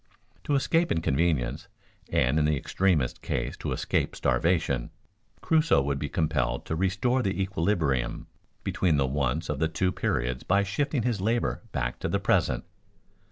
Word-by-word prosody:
To 145 - +1
escape 165 +5 +2
inconvenience, 80 -4 0 0.4
and 65 +5 +2
in 75 - +2
the 75 -1 +2
extremest 80 -4 0
case - - -2
to - - -4
escape - - -1
starvation, 80 -8 +1 0.5
Crusoe 155 - +3
would 70 0 -1
be 75 - -3
compelled 75 -6 0
to 80 - -2
restore 95 +9 +1
the 100 -4 -1
equilibrium 85 -9 0 0.4
between 85 -5 +1
the 70 - +2
wants 70 +4 -1
of 75 -2 -2
the 80 - +2
two 90 +3 0
periods 60 -6 -1
by 100 +2 +2
shifting 130 +6 -1
his 115 -5 0
labor 115 +4 0
back 60 -7 -2
to - - -2
the - - +1
present. - - +1
80 Hz, 155 wpm, -27 LUFS, 70-100 Hz, 0.5 s, Crusoe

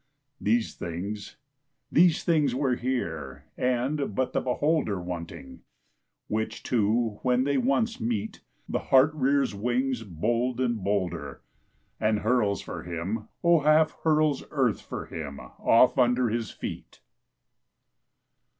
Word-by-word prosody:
These 115 +2 +1
things, 100 +5 -6 0.5
these 170 -1 +4
things 150 -7 +2
were 135 -1 +1
here 80 - -3
and 130 0 -1
but 130 -1 0
the - - +1
beholder 130 - 0
Wanting; 85 -2 -7 0.7
which 110 +1 -3
two 110 -1 +1
when 125 0 +2
they 140 +1 +1
once 235 -3 +1
meet, 110 -2 -2 0.3
The - - -1
heart 135 +3 +4
rears 140 -3 +1
wings 125 +4 -1
bold 115 +6 -1
and 120 -5 0
bolder 90 -9 -2 0.6
And 110 -1 +1
hurls 110 -4 +1
for - - -6
him, 90 +6 -4 0.2
O 170 -1 +5
half 155 +1 +4
hurls 155 -3 +2
earth 130 -7 +1
for - - -6
him 75 -4 -7
off 125 +3 +3
under 125 -1 +3
his 115 0 -2
feet. - - -8
120 Hz, 125 wpm, -27 LUFS, 100-135 Hz, 0.7 s, O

